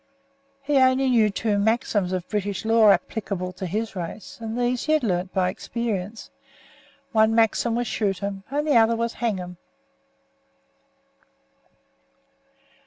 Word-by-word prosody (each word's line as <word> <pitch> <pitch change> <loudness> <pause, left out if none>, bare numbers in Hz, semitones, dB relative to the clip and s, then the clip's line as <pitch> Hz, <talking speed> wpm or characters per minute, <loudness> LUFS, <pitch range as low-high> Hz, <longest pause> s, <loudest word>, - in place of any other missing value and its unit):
He 285 0 +1
only 260 0 +3
knew 225 -3 +4
two 205 +1 -1
maxims 205 -3 +1
of 185 -2 -3
British 205 -1 -3
law 225 -1 +5
applicable 190 -1 -1
to 185 +1 -5
his 215 +4 -3
race, 180 +5 -7
and 225 +1 -4
these 245 0 0
he 310 - +2
had 310 - +2
learned 185 -3 -1
by 185 -1 +1
experience. 215 0 -4 0.8
One 220 -1 +3
maxim 230 +1 +2
was 240 +1 -1
"Shoot 200 -4 -2
'em" 200 -1 -4
and 290 +2 -1
the 290 -5 +4
other 230 0 +4
was 230 0 -2
"Hang 225 -4 0
him." 180 -1 -8
220 Hz, 140 wpm, -24 LUFS, 195-235 Hz, 0.8 s, law